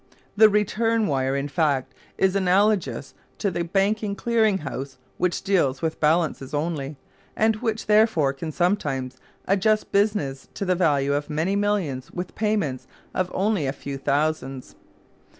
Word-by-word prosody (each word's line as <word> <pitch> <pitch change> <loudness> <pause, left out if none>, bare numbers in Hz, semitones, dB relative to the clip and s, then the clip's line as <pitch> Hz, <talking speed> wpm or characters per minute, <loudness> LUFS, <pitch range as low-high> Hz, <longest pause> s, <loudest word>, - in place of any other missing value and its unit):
The 215 +1 +7
return 220 +2 +1
wire, 135 -3 0
in 140 +1 -1
fact, 140 -4 0 0.2
is 190 0 +2
analogous 190 - +1 0.2
to 200 - -1
the 170 - -2
Banking 200 +3 0
Clearing 220 -3 +2
House, 135 0 -5 0.2
which 180 -1 0
deals 155 -9 +1
with 160 -1 -1
balances 155 -3 +1
only, 145 -2 -3 0.4
and 220 0 +2
which 225 -1 -2
therefore 210 -10 +3
can 155 +3 -6
sometimes 145 -8 -1 0.3
adjust 210 +3 +1
business 200 -10 0
to 200 - -3
the 185 - +2
value 145 -6 +2
of 145 +1 -2
many 160 +6 0
millions 200 -11 -1
with 180 0 -6
payments 205 - -1 0.3
of 185 -1 -1
only 195 -6 +1
a 135 - -1
few 140 -1 -6
thousands. 140 -2 -1
175 Hz, 145 wpm, -24 LUFS, 140-205 Hz, 0.4 s, The